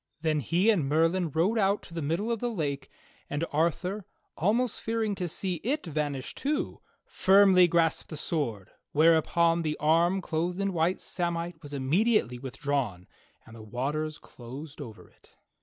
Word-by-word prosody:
Then 155 -2 +1
he 175 - +3
and 160 -10 0
Merlin 165 +3 +2
rowed 180 +10 +1
out 200 0 +2
to - - -12
the 165 - -3
middle 170 +10 -1
of 230 - -1
the 245 - -1
lake, 145 - -3 0.4
and 145 +3 -1
Arthur, 180 +6 0 0.3
almost 225 +6 +1
fearing 225 -2 -1
to 185 -2 -3
see 180 +2 -3
it 280 +3 -1
vanish 145 -4 -3
too, 290 +2 -2 0.2
firmly 190 -2 +5
grasped 165 -1 +1
the 155 - -6
sword, 120 - -3 0.2
whereupon 165 +2 +4
the 155 -2 -2
arm 170 +5 +3
clothed 175 +1 -2
in 195 -1 0
white 170 +2 +1
samite 170 -1 -3
was 145 - -10
immediately 145 - +1
withdrawn, 130 -8 -3 0.4
and 110 - -13
the 115 - -10
waters 145 +8 -3
closed 135 +5 -10
over 110 -3 -10
it. - - -26
165 Hz, 155 wpm, -28 LUFS, 145-190 Hz, 0.4 s, firmly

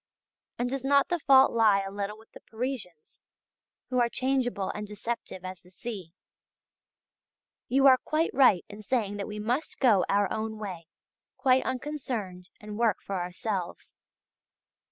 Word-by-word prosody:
And 245 - 0
does 265 +1 -3
not 280 0 +3
the 350 -1 0
fault 270 -2 +6
lie 215 -4 +4
a 195 0 -6
little 205 +1 -4
with 220 +1 -19
the - - -12
Parisians, 225 - -6 0.7
who 250 - +2
are 240 -1 +3
changeable 255 -6 0
and 210 0 -6
deceptive 210 -3 -5
as 185 -2 -7
the 180 - -20
sea? 190 -2 -7 1.6
You 270 +2 +3
are 260 -2 +8
quite 315 +2 0
right 250 -10 +5
in 210 +1 -10
saying 210 -3 -1
that 200 - -4
we 210 - -6
must 240 +8 -2
go 220 -8 +4
our 200 0 +3
own 220 0 -3
way, 185 -6 -7 0.5
quite 260 -1 +4
unconcerned, 245 -10 -4
and 210 0 -8
work 225 -4 +3
for 195 -2 -4
ourselves. 180 +1 -4
220 Hz, 155 wpm, -28 LUFS, 195-255 Hz, 1.6 s, are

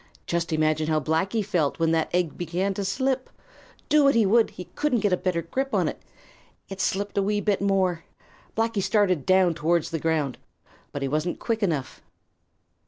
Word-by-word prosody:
Just 170 -1 -2
imagine 155 0 +1
how 155 -1 +2
Blacky 185 - 0
felt 170 -8 0
when 165 -1 +1
that 160 -1 +1
egg 175 -3 0
began 175 +3 -2
to 200 - -3
slip. 260 +6 -1 0.6
Do 300 -1 +4
what 275 - +4
he 225 -2 +4
would, 225 +3 +4
he 180 - -9
couldn't 255 -7 0
get 205 -3 +2
a - - +6
better 180 -2 -1
grip 270 +11 -2
on - - +2
it. - - -5 0.7
It 195 0 -5
slipped 200 +1 -1
a - - +3
wee 205 +1 0
bit 205 -1 0
more. 190 -4 +1 0.5
Blacky 225 -2 +1
started 185 -7 +1
down 185 -2 +4
towards 165 +2 0
the 165 - -2
ground. 150 -5 -1 0.5
But 145 - -4
he - - 0
wasn't 155 +5 -1
quick 225 -1 -2
enough. 160 -9 -2
185 Hz, 185 wpm, -25 LUFS, 160-205 Hz, 0.7 s, a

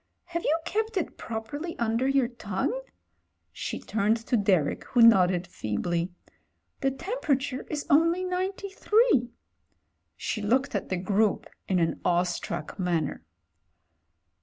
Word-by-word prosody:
have 340 -1 -4
you 315 - +2
kept 440 0 -1
it 360 - -2
properly 260 +10 -5
under 230 +2 +1
your 270 -2 +3
tongue?" 235 - -3 0.7
She - - -4
turned 215 +1 +1
to 230 +2 -1
Derek, 195 -8 +2
who 240 -2 +4
nodded 185 -5 +6
feebly. 170 - -2 0.7
"The 270 - +2
temperature 275 - -2
is 295 -2 -3
only 335 +4 +4
93." 385 - +1 0.9
She 215 - -3
looked 255 +7 +1
at 200 - -2
the 185 - 0
group 200 +3 +1 0.2
in 190 - +1
an 165 -2 0
awestruck 175 -1 -1
manner. 170 -5 -1
235 Hz, 120 wpm, -27 LUFS, -, 0.9 s, nodded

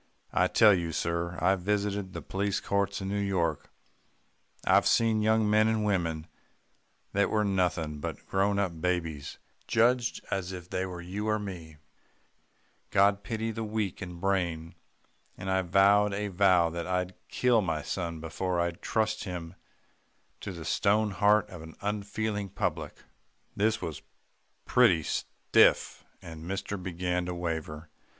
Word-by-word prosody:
I - - +3
tell 105 -2 +6
you, 85 -3 -1
sir, 85 +1 -2
I've 95 -1 +2
visited 100 0 -1
the - - -6
police 100 0 -1
courts 100 0 -1
in 95 - -4
New 100 +1 -1
York 95 -4 -1 1.0
I've - - +4
seen 110 -2 +3
young 110 0 +3
men 110 +1 +4
and 110 -1 +1
women 85 -6 0 0.9
that 100 +1 +2
were 105 -1 +1
nothing 90 -6 0
but - - -6
grown 100 +1 +1
up 90 -5 -1
babies 85 -5 -2 0.3
judged 120 +1 +2
as 95 -1 -2
if 90 -1 -8
they 95 +1 -2
were 90 -1 -7
you 100 +5 -4
or 110 - +2
me 90 -7 -7 1.1
God 100 +1 +3
pity 110 +2 -3
the 110 0 -4
weak 105 -3 -3
in 90 -2 -7
brain 85 -4 -1 0.6
and 95 +1 -4
I 95 0 +2
vowed 100 +3 +4
a 105 0 -2
vow 90 -3 +4
that 85 0 -4
I'd 90 0 -1
kill 125 -3 +3
my 80 -5 -2
son 85 -3 -3
before 85 +3 -2
I'd 85 0 -2
trust 110 -1 -1
him 90 -3 -6 0.9
to 100 - -6
the 85 -3 -8
stone 105 +1 +2
heart 105 +1 +3
of 90 -3 -8
the 80 0 -11
unfeeling 105 0 -2
public!' - - -3 0.5
"This 110 +2 +1
was 80 -3 -5 0.6
pretty 105 -11 +4
stiff, - - +2 0.2
and 80 -2 -9
mister 95 +2 -3
began 90 -1 -2
to 90 - -3
waver. 80 -2 -4
95 Hz, 150 wpm, -29 LUFS, 85-105 Hz, 1.1 s, tell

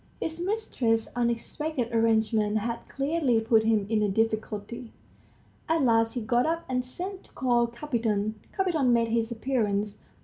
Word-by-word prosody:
His 325 +1 -3
mistress's 265 - 0
unexpected 245 +2 -2
arrangement 220 -2 +2
had 230 +2 -3
clearly 275 -4 +1
put 225 0 +4
him 220 -2 +2
in 220 0 +1
a 210 - +2
difficulty. 220 +2 -2 0.8
At 325 -2 +2
last 225 -2 +3
he 245 - -3
got 240 +5 +2
up 330 +1 -1
and 250 -1 0
sent 370 +9 -6
to - - -18
call 240 -2 +2
Kapiton. 230 -5 -1 0.2
Kapiton 350 -9 +1
made 230 -1 +2
his 230 0 0
appearance. 215 -4 -1
235 Hz, 145 wpm, -27 LUFS, 220-265 Hz, 0.8 s, put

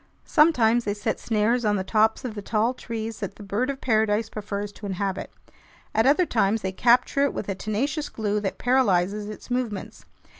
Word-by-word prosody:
Sometimes 240 -8 +4
they 205 -1 -2
set 205 - -2
snares 230 +2 +1
on 210 -1 +2
the 190 - -1
tops 220 +4 +2
of 240 - -4
the 205 - -6
tall 220 +4 +1
trees 225 -3 -5
that 200 - -5
the 210 - -11
bird 210 +7 -1
of 275 -1 -3
paradise 220 -2 +1
prefers 205 -1 -5
to 205 0 -9
inhabit. 195 0 -3 0.6
At 220 +3 +3
other 300 +6 +4
times 220 -5 +1
they 190 - -1
capture 245 +7 +3
it 280 - 0
with - - -4
a 195 - -1
tenacious 265 - -2
glue 210 -1 -1
that 200 -2 -3
paralyzes 210 -5 +1
its 215 +3 -10
movements. 240 -5 -3
220 Hz, 190 wpm, -25 LUFS, 205-245 Hz, 0.6 s, Sometimes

